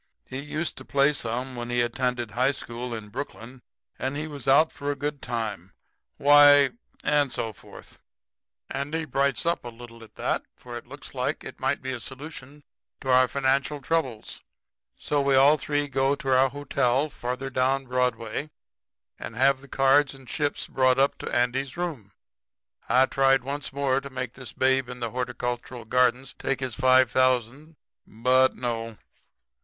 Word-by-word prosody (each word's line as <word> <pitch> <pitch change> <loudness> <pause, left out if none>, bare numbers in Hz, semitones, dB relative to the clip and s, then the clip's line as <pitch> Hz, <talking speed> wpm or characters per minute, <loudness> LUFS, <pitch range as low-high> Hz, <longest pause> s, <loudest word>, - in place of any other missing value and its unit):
He 130 - -6
used 150 +3 -3
to - - -8
play 140 +1 +3
some 125 0 -3
when 120 0 -5
he 120 0 +1
attended 120 -1 -1
high 130 +5 +2
school 120 -1 -6
in 110 -2 -6
Brooklyn; 125 0 -7 0.4
and 135 +2 -2
as 150 - -2
he - - -5
was 140 -4 -8
out 145 +4 +5
for 145 - -5
a 145 - 0
good 145 +1 -4
time, 105 -6 -4 0.4
why 145 0 +7 0.3
and 145 -3 +2
so 110 -2 -2
forth. - - -15 0.7
"Andy 145 +4 -2
brights 140 +1 0
up 170 +1 0
a 120 - -6
little 115 0 -12
at 110 - -17
that, - - -1
for - - -10
it - - -8
looks - - -11
like - - -2
it - - -9
might - - -1
be 130 - -3
a 125 - -4
solution 140 +2 -9 0.4
to 130 - -2
our 130 0 +6
financial 140 +2 0
troubles. 135 -6 -2 0.6
So 145 -1 0
we 140 -1 +3
all 140 +3 +7
three 145 -1 -1
go 135 0 +1
to 135 -2 0
our 130 +1 +4
hotel 140 0 0
further 130 +2 -4
down 135 +1 +1
Broadway 125 +1 -1 0.7
and 115 - -7
have 135 +2 +3
the 140 - -14
cards 135 +1 +3
and 135 -2 -15
chips 145 +3 -2
brought 130 -1 +2
up 135 +1 +2
to - - -5
Andy's 125 +3 0
room. 150 - -4 0.8
I 130 +2 +5
tried 135 -1 +3
once 140 +1 -4
more 135 -1 0
to 140 - -8
make 125 -2 -5
this 130 -4 -8
Babe 130 -1 +1
in 125 0 -7
the 115 -2 -3
Horticultural 125 -1 -4
Gardens 125 +2 +1
take 135 - -1
his 130 -3 -3
five 130 +2 +4
thousand. 130 +4 +1 0.3
But 130 +4 +3
no. 115 -2 -4
130 Hz, 170 wpm, -26 LUFS, 125-140 Hz, 0.8 s, why